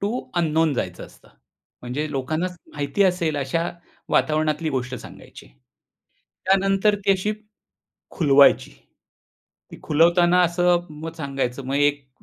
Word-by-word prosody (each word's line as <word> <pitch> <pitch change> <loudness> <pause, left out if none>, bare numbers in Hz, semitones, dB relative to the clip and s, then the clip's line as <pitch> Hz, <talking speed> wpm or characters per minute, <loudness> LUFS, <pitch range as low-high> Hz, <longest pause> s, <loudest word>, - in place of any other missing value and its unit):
To 200 +1 -1 0.3
unknown 160 -2 +2
जायचं - - -4
असतं. - - -21 0.5
म्हणजे 145 +5 -4
लोकांना 155 +6 -2 0.3
माहिती 150 +7 -1
असेल 170 -5 0
अशा 145 +5 -1 0.4
वातावरणातली 155 +1 +1
गोष्ट 125 -1 -3
सांगायची. - - -12 1.0
त्यानंतर 195 +2 +3
ती 195 - +6
अशी 195 +3 -1 0.8
खुलवायची. 140 -4 +4 1.0
ती - - -11
खुलवताना 175 +3 +4
असं 175 0 +2
मग 155 +2 -8
सांगायचं, 135 -3 -3
मग 135 +1 -2
एक 145 -1 +1
155 Hz, 115 wpm, -23 LUFS, 140-175 Hz, 1.0 s, ती